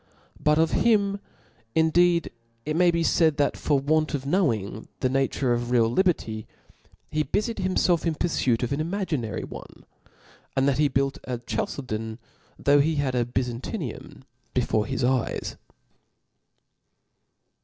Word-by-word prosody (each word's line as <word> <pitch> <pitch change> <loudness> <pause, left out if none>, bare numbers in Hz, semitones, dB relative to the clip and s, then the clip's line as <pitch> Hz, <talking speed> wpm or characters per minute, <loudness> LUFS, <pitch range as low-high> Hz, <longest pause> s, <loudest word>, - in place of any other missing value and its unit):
But 150 0 +4
of 160 0 +3
him 200 -3 +2 0.6
in^ 160 -1 +3
deed 175 -1 +3 0.3
it 155 - -1
may 175 +1 +5
be 170 -1 +1
faid, 160 -2 +3
that 145 - +2
for 145 - +1
want 155 +3 +1
of 135 - -4
Icnowing 120 - 0
tlie 130 - 0
nature 135 -1 +1
of 120 0 -2
real 120 -2 +4
liberty, 120 - 0 0.6
he 155 0 +1
bufied 215 - -1
himfelf 185 -3 +1
in 165 - 0
purfuit 130 -8 0
of 125 - -1
an 145 - -1
imaginary 160 - -2
one; - - -10 0.7
and 135 +1 +3
that 140 0 +1
he 150 - +5
built 135 0 0
a 125 -1 -3
Chalcedon, 120 - -4 0.4
though 145 0 +4
he 155 +3 +2
bad 140 -3 0
a 120 -1 +1
Byzantium 125 - -4 0.3
before 105 -1 +1
his 135 -1 -2
eyes. 125 -1 0
145 Hz, 145 wpm, -25 LUFS, 125-170 Hz, 0.7 s, may